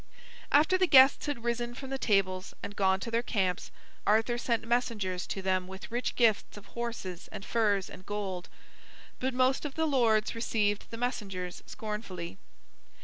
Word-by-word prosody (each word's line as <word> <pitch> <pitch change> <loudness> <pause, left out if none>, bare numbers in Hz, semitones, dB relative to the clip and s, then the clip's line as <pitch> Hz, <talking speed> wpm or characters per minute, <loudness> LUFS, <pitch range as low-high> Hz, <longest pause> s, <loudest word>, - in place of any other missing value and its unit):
After 315 +6 +5
the 370 - +4
guests 270 -1 +7
had 280 -6 -3
risen 240 0 -2
from 270 +1 -7
the 270 - -2
tables 190 -4 +1
and 205 - -6
gone 190 -1 +3
to 230 - -4
their 230 +1 +2
camps, 190 -7 -1 0.4
Arthur 225 +3 +3
sent 230 -2 0
messengers 215 -7 0
to 195 - -4
them 185 -1 +1
with 190 +3 -9
rich 240 +2 -1
gifts 225 -3 +2
of 205 - -11
horses 230 -7 -5
and 195 - -7
furs 205 -4 +1
and 185 - -11
gold. 195 -3 -4 0.7
But 260 0 -1
most 255 +1 +3
of 290 -3 -5
the 320 - +1
lords 230 -7 +3
received 210 -3 0
the 230 - -7
messengers 195 -7 -3
scornfully. 205 - -6
220 Hz, 165 wpm, -30 LUFS, 190-245 Hz, 0.7 s, guests